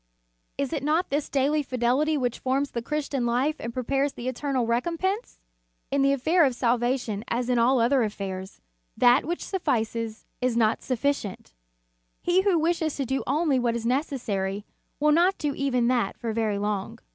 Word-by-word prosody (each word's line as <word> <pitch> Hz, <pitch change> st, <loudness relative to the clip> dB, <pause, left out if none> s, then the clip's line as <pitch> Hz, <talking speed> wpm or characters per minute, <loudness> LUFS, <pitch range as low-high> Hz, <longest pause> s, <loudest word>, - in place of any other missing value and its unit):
Is 280 Hz, 0 st, -2 dB
it 300 Hz, -, -1 dB
not 310 Hz, +5 st, 0 dB
this 290 Hz, +1 st, -1 dB
daily 285 Hz, +2 st, +2 dB
fidelity 260 Hz, +4 st, +1 dB
which 245 Hz, -3 st, -1 dB
forms 270 Hz, +2 st, 0 dB
the 235 Hz, -, -3 dB
Christian 280 Hz, 0 st, -2 dB
life 265 Hz, +6 st, +1 dB
and 235 Hz, -, -4 dB
prepares 270 Hz, +3 st, 0 dB
the 240 Hz, -, -6 dB
eternal 260 Hz, -1 st, -1 dB
recom 245 Hz, +9 st, 0 dB
pense? 390 Hz, +7 st, -2 dB, 0.5 s
In 280 Hz, -, +2 dB
the 275 Hz, 0 st, +4 dB
affair 315 Hz, +6 st, +3 dB
of 265 Hz, -4 st, +2 dB
salvation 240 Hz, -3 st, 0 dB
as 240 Hz, +1 st, -1 dB
in 245 Hz, -1 st, +3 dB
all 250 Hz, +2 st, +4 dB
other 250 Hz, +3 st, +3 dB
affairs, 195 Hz, -3 st, -4 dB, 0.4 s
that 245 Hz, +3 st, +5 dB
which 345 Hz, +3 st, -3 dB
suffices 230 Hz, -, -2 dB, 0.2 s
is 250 Hz, -2 st, +1 dB
not 220 Hz, -1 st, +3 dB
suffi 265 Hz, +2 st, +1 dB
cient. 205 Hz, -, -7 dB, 0.7 s
He 355 Hz, +2 st, +2 dB
who 385 Hz, -3 st, +3 dB
wishes 320 Hz, -1 st, 0 dB
to 275 Hz, -, -2 dB
do 265 Hz, +2 st, -1 dB
only 290 Hz, -1 st, +2 dB
what 235 Hz, -1 st, 0 dB
is 235 Hz, -1 st, -4 dB
necessary, 220 Hz, -7 st, -1 dB, 0.3 s
will 300 Hz, +1 st, +4 dB
not 350 Hz, +5 st, +4 dB
do 295 Hz, -2 st, -1 dB
even 255 Hz, -4 st, +1 dB
that 240 Hz, -6 st, 0 dB
for 230 Hz, -2 st, -3 dB
very 215 Hz, -2 st, 0 dB
long. 205 Hz, +2 st, -2 dB
255 Hz, 180 wpm, -26 LUFS, 235-295 Hz, 0.7 s, that